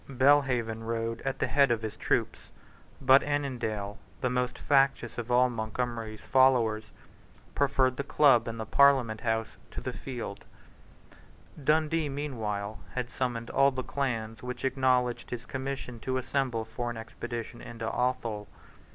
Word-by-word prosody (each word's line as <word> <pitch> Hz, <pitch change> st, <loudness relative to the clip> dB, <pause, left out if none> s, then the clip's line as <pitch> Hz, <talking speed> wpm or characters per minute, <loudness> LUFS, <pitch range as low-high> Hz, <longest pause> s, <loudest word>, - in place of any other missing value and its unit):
Belhaven 130 Hz, -4 st, +3 dB
rode 115 Hz, 0 st, -2 dB
at 135 Hz, 0 st, -2 dB
the -, -, +1 dB
head 140 Hz, -1 st, +4 dB
of 115 Hz, -2 st, 0 dB
his 110 Hz, -, -4 dB
troop: -, -, 0 dB, 0.6 s
but 135 Hz, +1 st, +6 dB
Annandale, 120 Hz, -8 st, -2 dB, 0.2 s
the 125 Hz, -, +1 dB
most 125 Hz, 0 st, -1 dB
factious 135 Hz, -4 st, +2 dB
of 120 Hz, 0 st, -5 dB
all 125 Hz, +1 st, +5 dB
Montgomery's 115 Hz, -1 st, -4 dB
followers, 115 Hz, -5 st, +3 dB, 0.6 s
preferred 130 Hz, -2 st, +2 dB
the 140 Hz, -, -1 dB
Club 135 Hz, -5 st, +4 dB
and 115 Hz, 0 st, -4 dB
the 110 Hz, -, -3 dB
Parliament 130 Hz, -6 st, +4 dB
House 110 Hz, -1 st, -1 dB
to -, -, -6 dB
the -, -, -4 dB
field, 120 Hz, -6 st, -6 dB, 1.2 s
Dundee, 155 Hz, +1 st, +2 dB
meanwhile, 110 Hz, -8 st, -3 dB, 0.2 s
had 125 Hz, -1 st, -2 dB
summoned 120 Hz, -2 st, -2 dB
all 135 Hz, +1 st, +5 dB
the 130 Hz, -1 st, -4 dB
clans 115 Hz, -6 st, -3 dB
which 125 Hz, +1 st, -5 dB
acknowledged 130 Hz, -2 st, +1 dB
his 125 Hz, 0 st, -5 dB
commission 130 Hz, -2 st, -5 dB
to 130 Hz, +4 st, -2 dB
assemble 130 Hz, -3 st, -1 dB
for 120 Hz, +2 st, -4 dB
an 120 Hz, -, -5 dB
expedition 120 Hz, +1 st, -6 dB
into 115 Hz, -1 st, -7 dB
Athol. 115 Hz, -3 st, -1 dB
125 Hz, 145 wpm, -29 LUFS, 115-135 Hz, 1.2 s, but